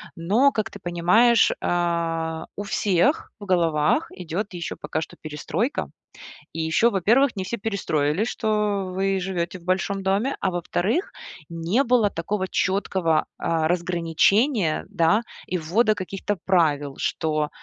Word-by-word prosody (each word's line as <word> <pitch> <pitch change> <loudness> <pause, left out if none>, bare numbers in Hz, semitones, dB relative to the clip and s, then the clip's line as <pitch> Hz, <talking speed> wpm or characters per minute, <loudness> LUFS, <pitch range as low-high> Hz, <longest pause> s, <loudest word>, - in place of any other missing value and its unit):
Но, 215 +12 +3
как 215 -5 -2
ты - - -10
понимаешь, 180 +7 +4
а, 165 -2 -1
у 205 - -4
всех 205 - +1
в 205 - -8
головах 165 -5 +2
идет 180 +3 -5
еще 170 -1 -5
пока 160 - -4
что - - -8
перестройка. 155 - -3 0.7
И 165 - -3
еще, 160 +9 +3
во-первых, 230 +6 +3
не 190 - -3
все 235 +6 -4
перестроилсь, 195 -4 -1
что 210 -4 0
вы 195 +1 0
живете 180 -1 -3
в - - -20
большом 190 +2 0
доме, 200 +8 0
а 190 - 0
во-вторых, 185 - -1 0.4
не 170 +10 0
было 240 -5 +3
такого 190 +3 -3
четкого, 185 -4 0
а, 160 -1 0
разграничения, 175 - +1
да, 170 +7 +2 0.2
и 180 - -2
ввода 215 +8 +2
каких-то 195 +1 -4
правил, 145 -6 +2
что, 155 -2 -1
185 Hz, 135 wpm, -24 LUFS, 165-210 Hz, 0.7 s, понимаешь